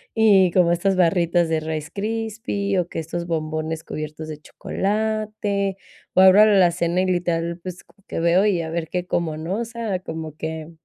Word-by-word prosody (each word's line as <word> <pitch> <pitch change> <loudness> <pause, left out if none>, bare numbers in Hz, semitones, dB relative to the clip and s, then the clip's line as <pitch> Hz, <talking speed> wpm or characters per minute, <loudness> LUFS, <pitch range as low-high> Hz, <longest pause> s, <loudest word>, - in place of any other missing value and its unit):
y 200 -5 +5
como 175 -1 +3
estas 190 +3 +1
barritas 170 -1 +2
de 160 - +1
Rice 155 -1 -4
Krispies, 210 -2 -2
o 175 - -1
que - - -7
estos 170 +2 -5
bombones 155 0 -3
cubiertos 155 +1 -6
de 155 -1 -6
chocolate, 210 0 -2 0.4
o - - +4
abro 190 +3 +8
la 210 -2 +4
alacena 175 -1 +3
y 185 - +1
literal, 170 -1 -1
pues, 180 0 -8 0.2
que - - -4
veo 170 +3 +3
y 180 -5 +1
a 160 - -5
ver 165 -1 -3
qué 180 0 -2
cómo, 165 -3 -1
¿no?, 175 +7 -3
o 235 - -2
sea, 225 -5 -3
como 160 -3 -7
que 160 0 -5
175 Hz, 185 wpm, -22 LUFS, 160-200 Hz, 0.4 s, abro